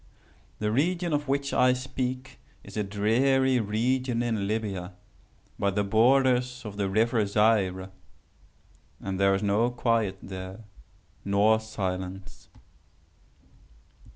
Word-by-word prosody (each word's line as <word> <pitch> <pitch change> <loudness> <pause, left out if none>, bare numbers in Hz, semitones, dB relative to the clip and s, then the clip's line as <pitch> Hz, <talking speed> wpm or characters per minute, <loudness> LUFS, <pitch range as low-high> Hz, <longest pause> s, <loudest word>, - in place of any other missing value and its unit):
"The 105 0 -1
region 170 +6 0
of 145 0 -1
which 140 +1 -1
I 125 0 +4
speak 130 0 -4 0.2
is - - -12
a 105 - 0
dreary 125 +6 +2
region 120 +3 0
in 110 -4 -1
Libya, 100 -4 -3 0.7
by 100 - +2
the 100 +1 0
borders 125 +3 +2
of 105 -1 -7
the 100 -1 -1
river 110 +2 +2
Zaire. 100 -3 +1 1.1
And 95 -1 -4
there 100 0 +4
is 100 - -3
no 105 +4 +2
quiet 115 -5 0
there, 95 +2 -8 0.6
nor 105 +2 +3
silence. 95 -3 -6
110 Hz, 115 wpm, -27 LUFS, 100-125 Hz, 1.1 s, I